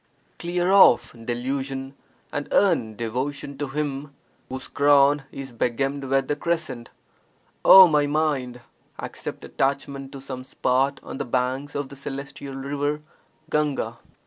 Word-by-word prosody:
Clear 175 +1 0
off 120 -11 +6
delusion 135 +3 -4 0.4
and 145 - -3
earn 115 - +2
devotion 130 +5 -3
to 145 - -2
Him 140 0 -4 0.3
whose 130 +1 -5
crown 145 0 +4
is 135 -1 -7
begemmed 135 +4 -1
with 135 +1 +1
the 145 - 0
crescent. 155 -7 -3 0.7
Oh 190 -1 +10
my 150 -3 +2
mind, 145 -5 -1 0.4
accept - - -7
attachment 135 0 -2
to 135 - -7
some 130 -1 -7
spot 135 +2 0
on - - -7
the 140 - -2
banks 130 +3 -1
of 140 -1 -3
the 140 - -10
celestial 140 0 -7
river 145 +2 -2 0.5
(Gahga). 150 -2 0
140 Hz, 130 wpm, -24 LUFS, 130-145 Hz, 0.7 s, Oh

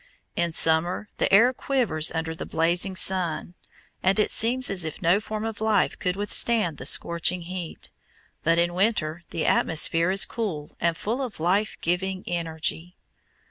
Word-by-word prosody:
In 170 -1 -1
summer 165 +6 +2
the - - 0
air 235 +6 +5
quivers 235 - +1
under 160 0 -3
the 160 - -7
blazing 175 +4 0
sun, 180 -3 +2 0.5
and 190 +1 +1
it 210 - +2
seems 245 +2 +2
as 185 -3 +1
if 155 -1 -5
no 175 +4 +2
form 215 0 -5
of 225 -1 -6
life 215 -3 +1
could 180 0 -1
withstand 205 -4 +1
the 130 - -7
scorching 170 +3 +1
heat, 175 -1 -7 0.5
but 165 +1 +2
in 175 0 +1
winter 175 -5 0
the 165 - -3
atmosphere 165 +2 +2
is 195 +2 +4
cool 175 -11 -5
and 170 -1 0
full 230 +8 -3
of 250 -9 -6
life 195 +6 0
giving 185 +2 -2
energy. 165 +1 -4
180 Hz, 160 wpm, -24 LUFS, 165-210 Hz, 0.5 s, air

